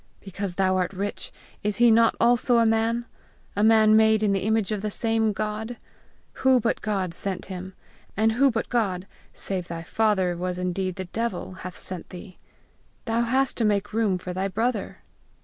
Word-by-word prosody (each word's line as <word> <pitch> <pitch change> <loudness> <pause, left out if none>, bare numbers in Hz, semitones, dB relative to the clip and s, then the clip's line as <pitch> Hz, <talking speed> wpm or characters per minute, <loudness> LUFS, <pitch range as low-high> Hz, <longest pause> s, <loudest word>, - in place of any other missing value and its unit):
Because 195 -1 -5
thou 185 0 +2
art 180 +1 -1
rich, 200 +2 -4 0.3
is 205 -1 -1
he 240 -1 +6
not 230 +1 +4
also 240 +1 +3
a 230 - +4
man? 225 +1 +1 0.5
a 205 - +1
man 220 -1 +6
made 220 0 +4
in 205 - +3
the 195 - +1
image 220 -1 +1
of 210 -2 -2
the 215 - -2
same 225 0 +1
God? 215 +3 -4 0.6
Who 260 -1 +5
but 235 0 -1
God 195 -5 -2
sent 190 +1 -4
him? 185 +1 -8 0.4
And 220 +1 +3
who 270 +5 +4
but 225 -2 -2
God, 195 -7 -1 0.3
save 185 -3 -4
thy 165 -1 -6
father 190 -2 +1
was 180 +1 -3
indeed 180 0 -2
the 190 -1 -5
devil, 195 -1 -3
hath 185 -1 -8
sent 185 -2 -6
thee? 185 +1 -11 0.7
Thou 230 0 +1
hast 260 +3 +1
to 235 - +1
make 205 -1 0
room 215 -4 +1
for 180 0 -6
thy 190 +2 -1
brother! 225 +2 -2
210 Hz, 185 wpm, -25 LUFS, 185-225 Hz, 0.7 s, he